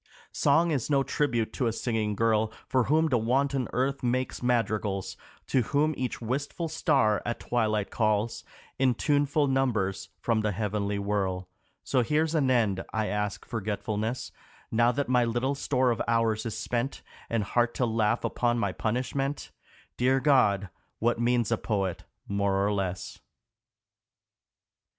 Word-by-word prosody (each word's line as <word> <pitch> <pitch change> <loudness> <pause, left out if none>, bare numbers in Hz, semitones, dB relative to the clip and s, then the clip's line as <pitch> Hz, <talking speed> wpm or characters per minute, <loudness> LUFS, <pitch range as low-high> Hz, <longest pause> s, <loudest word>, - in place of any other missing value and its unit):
Song 165 +4 +3
is 140 -4 -1
no 140 -2 +3
tribute 120 -7 0
to 125 - 0
a - - +1
singing 110 -2 -1
girl, 110 0 +2 0.2
For 130 -3 +2
whom 155 +5 +3
the 125 -4 +2
wanton 135 +3 +1
earth 135 +2 0
makes 130 +1 -1
madrigals, 110 -5 0 0.3
To 130 - +2
whom 150 +6 +1
each 130 -2 -3
wistful 140 +8 -3
star 110 -8 +2
at 120 - -3
twilight 110 -4 0
calls 110 0 0 0.4
In 130 -2 +3
tuneful 145 +2 +2
numbers 110 -8 0
from 115 -2 +1
the 105 -1 0
heavenly 105 0 -1
whirl; 95 -3 -1 0.4
So 130 - +2
here's 155 +6 +1
an 145 -5 +2
end, 105 -7 +2
I 110 -1 -1
ask 105 -1 -2
forgetfulness 110 +1 -3 0.4
Now 120 +2 +4
that 140 +3 -2
my 125 -1 +3
little 120 +4 0
store 130 -2 +1
of 115 - -1
hours 115 -1 +1
is 110 - -4
spent, 120 +3 -2 0.3
And 115 -2 0
heart 120 +3 +1
to 125 - +1
laugh 115 0 +1
upon 120 -1 0
my 100 -4 0
punishment 130 +7 -2 0.5
Dear 130 +2 +3
God, 105 -9 +3 0.3
what 120 +1 +1
means 120 -2 +1
a 115 - +1
poet 95 -5 -2 0.2
more 100 -1 +1
or 105 - +1
less 95 -2 -3
115 Hz, 150 wpm, -28 LUFS, 105-130 Hz, 0.5 s, Now